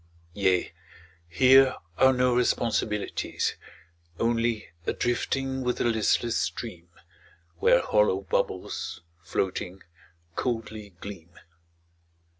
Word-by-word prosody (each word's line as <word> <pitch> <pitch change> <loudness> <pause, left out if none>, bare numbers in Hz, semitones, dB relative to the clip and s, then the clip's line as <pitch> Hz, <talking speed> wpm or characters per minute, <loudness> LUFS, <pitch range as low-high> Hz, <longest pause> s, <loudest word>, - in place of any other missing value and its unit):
Yea, 95 -2 +1 0.6
here 130 +6 +6 0.2
are 130 - +7
no 125 -1 +2
responsibilities. 115 -3 0 0.7
Only 115 -3 0 0.2
a - - +1
drifting 130 +2 -1
with 125 -1 -1
the - - 0
listless 115 -1 +1
stream 85 +1 -4 0.7
Where - - +4
hollow 105 -2 +2
bubbles, 95 - -2 0.2
floating, 95 0 -3 0.5
coldly 110 -5 -4
gleam. 85 -4 -9
110 Hz, 85 wpm, -27 LUFS, 95-125 Hz, 0.7 s, are